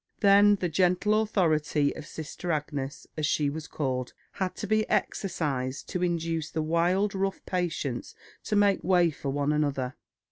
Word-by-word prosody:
Then 205 Hz, 0 st, +6 dB
the 185 Hz, -2 st, -1 dB
gentle 185 Hz, +5 st, +2 dB
authority 155 Hz, -8 st, +1 dB
of 155 Hz, -, -8 dB
Sister 160 Hz, +3 st, -5 dB
Agnes, 145 Hz, -3 st, -3 dB
as 155 Hz, -2 st, 0 dB
she 145 Hz, -1 st, +1 dB
was 160 Hz, +1 st, -6 dB
called, 130 Hz, -4 st, -3 dB, 0.2 s
had 185 Hz, -2 st, -3 dB
to -, -, -5 dB
be 215 Hz, +1 st, +1 dB
exercised 140 Hz, -8 st, -1 dB
to 180 Hz, -, -2 dB
induce 165 Hz, -3 st, -1 dB
the 160 Hz, -, -2 dB
wild, 175 Hz, +6 st, +1 dB
rough 195 Hz, 0 st, -2 dB
patients 165 Hz, -8 st, -2 dB, 0.3 s
to 215 Hz, -, 0 dB
make 205 Hz, -1 st, +3 dB
way 175 Hz, -2 st, +4 dB
for 140 Hz, -1 st, -5 dB
one 145 Hz, +2 st, 0 dB
another. 140 Hz, -4 st, 0 dB
165 Hz, 155 wpm, -28 LUFS, 145-190 Hz, 0.3 s, Then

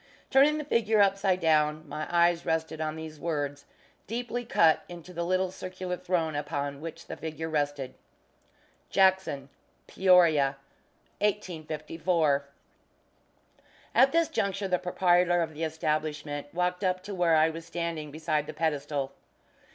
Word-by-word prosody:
Turning 285 Hz, +3 st, +5 dB
the 305 Hz, -, -3 dB
figure 225 Hz, -5 st, +2 dB
upside 195 Hz, -2 st, +3 dB
down, 155 Hz, -1 st, +2 dB
my 155 Hz, +1 st, -5 dB
eyes 170 Hz, 0 st, +3 dB
rested 160 Hz, -1 st, -2 dB
on 155 Hz, 0 st, -2 dB
these 160 Hz, -1 st, -8 dB
words, 145 Hz, -3 st, -3 dB, 0.4 s
deeply 245 Hz, +2 st, -3 dB
cut 165 Hz, -8 st, +4 dB
into 175 Hz, +1 st, -10 dB
the 170 Hz, 0 st, -2 dB
little 185 Hz, +1 st, 0 dB
circular 185 Hz, -1 st, -5 dB
throne 165 Hz, -4 st, -1 dB
upon 145 Hz, -1 st, -3 dB
which 165 Hz, +1 st, -8 dB
the -, -, -6 dB
figure 160 Hz, 0 st, -5 dB
rested: 145 Hz, -4 st, -2 dB, 1.0 s
JACKSON: 190 Hz, -8 st, +2 dB, 0.4 s
PEORIA, 165 Hz, -7 st, +4 dB, 0.6 s
1854. 160 Hz, -5 st, 0 dB, 1.5 s
At 265 Hz, +1 st, +5 dB
this 335 Hz, 0 st, +3 dB
juncture 200 Hz, -, -1 dB
the 180 Hz, -1 st, +1 dB
proprietor 175 Hz, -1 st, +3 dB
of 160 Hz, -1 st, -5 dB
the 155 Hz, +2 st, -5 dB
establishment 150 Hz, -2 st, -2 dB
walked 180 Hz, +2 st, -1 dB
up 185 Hz, 0 st, 0 dB
to 200 Hz, +1 st, -6 dB
where 175 Hz, -3 st, +3 dB
I 160 Hz, +1 st, +4 dB
was 165 Hz, +1 st, -8 dB
standing 170 Hz, -3 st, -3 dB
beside 155 Hz, 0 st, -1 dB
the 155 Hz, -, -6 dB
pedestal. 145 Hz, -3 st, -1 dB
165 Hz, 135 wpm, -28 LUFS, 155-185 Hz, 1.5 s, Turning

